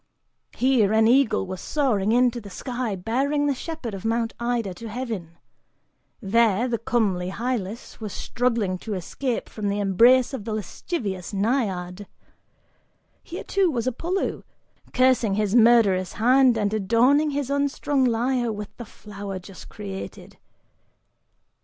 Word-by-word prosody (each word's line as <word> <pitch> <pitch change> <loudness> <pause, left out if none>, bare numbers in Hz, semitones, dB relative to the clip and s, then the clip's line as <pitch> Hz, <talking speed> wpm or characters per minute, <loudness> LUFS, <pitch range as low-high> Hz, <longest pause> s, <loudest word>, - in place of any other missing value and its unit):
Here, 245 -6 +3
an 220 0 +4
eagle 235 -5 +3
was 185 -1 -6
soaring 220 -9 0
into 245 0 +2
the 200 - -10
sky 245 0 -4
bearing 270 +10 0
the 285 - +2
shepherd 270 -4 -6
of 195 - -7
Mount 225 0 0
Ida 235 -5 -1
to 225 +6 -9
heaven; 215 -8 -5 0.8
there, 230 +1 +2
the 235 -2 -1
comely 200 -7 0
Hylas 230 0 -4
was 215 -3 -5
struggling 230 -7 -1
to 215 0 -4
escape 235 +7 -3
from 215 -2 -5
the 200 +1 -1
embrace 235 +7 +4
of 260 - -4
the 220 0 -4
lascivious 205 - -4
Naiad. 195 -4 -1 1.1
Here, - - -7
too, 390 -2 +1
was 240 -6 -2
Apollo, 335 +10 -2 0.5
cursing 255 -5 +3
his 210 -1 0
murderous 220 -6 +4
hand 250 +1 +4
and 205 -1 0
adorning 235 +9 +3
his 280 -2 -2
unstrung 280 -1 0
lyre 240 0 +1
with 210 -1 -7
the 240 - -7
flower 200 -2 -8
just 185 +1 -12
created. 195 -2 -8
230 Hz, 135 wpm, -24 LUFS, 200-255 Hz, 1.1 s, an